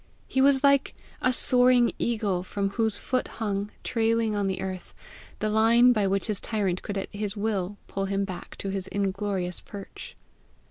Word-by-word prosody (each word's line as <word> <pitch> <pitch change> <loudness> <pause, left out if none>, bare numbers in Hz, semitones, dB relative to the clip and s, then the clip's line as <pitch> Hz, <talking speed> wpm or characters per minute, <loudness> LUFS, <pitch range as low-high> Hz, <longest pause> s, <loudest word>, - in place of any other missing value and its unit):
He 265 - +1
was 275 0 +5
like 280 -1 +3 0.3
a 255 - +3
soaring 250 -1 +4
eagle 210 -6 0
from 195 +2 -2
whose 220 -1 0
foot 255 +4 -1
hung, 205 -2 -2
trailing 225 -2 +1
on 200 -1 0
the 190 - -2
earth, 185 -1 -6 0.4
the 215 - -1
line 230 +3 +5
by 210 -4 +1
which 195 0 0
his 210 -3 -2
tyrant 195 -5 -1
could 205 - -4
at 195 - -5
his 205 0 -3
will 205 -2 -1
pull 195 0 -3
him 195 0 0
back 185 -2 -8
to 195 - -5
his 190 -1 -3
inglorious 195 -2 -2
perch. 200 -1 -10
205 Hz, 175 wpm, -27 LUFS, 195-230 Hz, 0.4 s, was